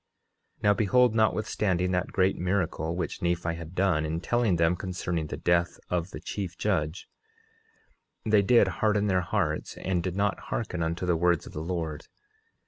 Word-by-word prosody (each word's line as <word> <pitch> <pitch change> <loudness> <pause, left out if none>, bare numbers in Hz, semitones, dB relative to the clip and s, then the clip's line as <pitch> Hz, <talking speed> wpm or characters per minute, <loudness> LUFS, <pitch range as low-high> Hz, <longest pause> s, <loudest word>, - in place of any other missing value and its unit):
10:13 - - -27
Now 105 0 +5
behold, 115 +4 +3
notwithstanding 105 -4 +1
that 90 -1 -1
great 95 0 +2
miracle 90 -3 -1
which 85 -3 -4
Nephi 85 -1 0
had 85 +1 -8
done 90 -5 +2
in 80 +1 -2
telling 115 +1 +1
them 85 +1 +3
concerning 85 -3 -3
the - - -5
death 85 0 +1
of 90 0 0
the - - -8
chief 95 -4 -5
judge, 75 +4 -1 1.2
they 105 -2 +4
did 120 +4 +5
harden 105 -1 +3
their 95 -3 +2
hearts 90 -5 -2
and 90 -2 -1
did 90 0 -3
not 100 0 0
hearken 70 +8 -2
unto 85 +2 -1
the 90 -1 +2
words 85 0 +2
of - - -11
the 75 - -4
Lord. 80 -3 -4
90 Hz, 170 wpm, -28 LUFS, 85-100 Hz, 1.2 s, Now